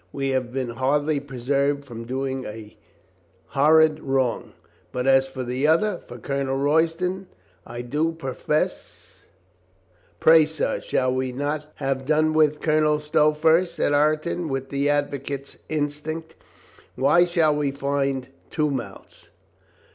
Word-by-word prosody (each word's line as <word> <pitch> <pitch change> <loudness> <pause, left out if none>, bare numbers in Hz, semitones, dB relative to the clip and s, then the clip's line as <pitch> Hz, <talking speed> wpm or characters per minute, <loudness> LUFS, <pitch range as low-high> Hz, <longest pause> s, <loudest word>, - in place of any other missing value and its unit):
We 135 -1 -2
have 130 -2 -1
been 130 -1 -3
hardly 145 +5 0
preserved 140 +1 -1
from 115 -3 -8
doing 130 +1 -3
a 105 -1 -9 0.7
hor 150 +3 +4
rid 155 -1 +4
wrong. 135 -4 -1 0.4
But 125 0 -3
as 135 0 +4
for 130 -1 -6
the 125 +4 -1
other, 175 +4 +2
for 120 - -11
Colonel 135 +2 -2
Roy 150 +4 +3
ston, 180 +3 -4 0.4
I 120 +1 -6
do 150 +7 0
profess 150 -1 -4 0.5
" 95 -1 -37
"Pray, 160 -1 +6
sir, 155 0 -2
shall 130 -1 0
we 130 0 -1
not 145 +3 -3
have 135 -1 -3
done 155 +1 +2
with 155 -1 +3
Colonel 155 -1 +2
Stow 150 0 +3
first?" 165 +3 +2
said 145 - +1
Ireton 155 +3 +1
with 135 0 -3
the 140 +1 0
advocate's 140 -1 -2
instinct. 155 +2 -3 0.6
"Why 150 +6 +4
shall 165 -4 +2
we 145 -1 0
find 140 -1 -1 0.2
two 150 -2 0
mouths? 130 -3 -8
145 Hz, 140 wpm, -24 LUFS, 130-155 Hz, 0.7 s, Pray